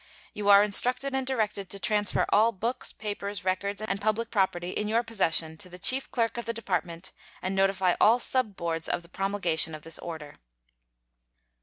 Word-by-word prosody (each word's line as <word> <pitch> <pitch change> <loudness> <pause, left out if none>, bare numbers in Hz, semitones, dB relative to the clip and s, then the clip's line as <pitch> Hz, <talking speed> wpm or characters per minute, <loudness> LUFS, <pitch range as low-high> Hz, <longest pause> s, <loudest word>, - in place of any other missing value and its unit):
You 205 -1 -2
are 200 0 +8
instructed 250 +6 +3
and 265 -1 -1
directed 210 -6 -1
to 200 - -3
transfer 210 0 +1
all 220 +3 +4
books, 230 +5 -3
papers, 205 -2 -6
records, 200 +3 -1
and 200 -1 -3
public 215 +2 -1
property 185 -4 0
in 210 - -2
your 230 +2 +1
possession 165 -8 -1
to 180 +2 -8
the 180 - -11
chief 260 +9 +3
clerk 230 -1 -1
of 235 - -6
the 230 - -2
Department, 180 -5 -3 0.3
and 185 - -3
notify 195 -2 +2
all 225 +3 +6
sub 250 -5 -1
boards 165 -2 -3
of 175 - -1
the 170 - -17
promulgation 180 -5 +1
of 155 - -12
this 165 -1 -3
order. 160 -4 -8
200 Hz, 180 wpm, -27 LUFS, 180-225 Hz, 0.3 s, are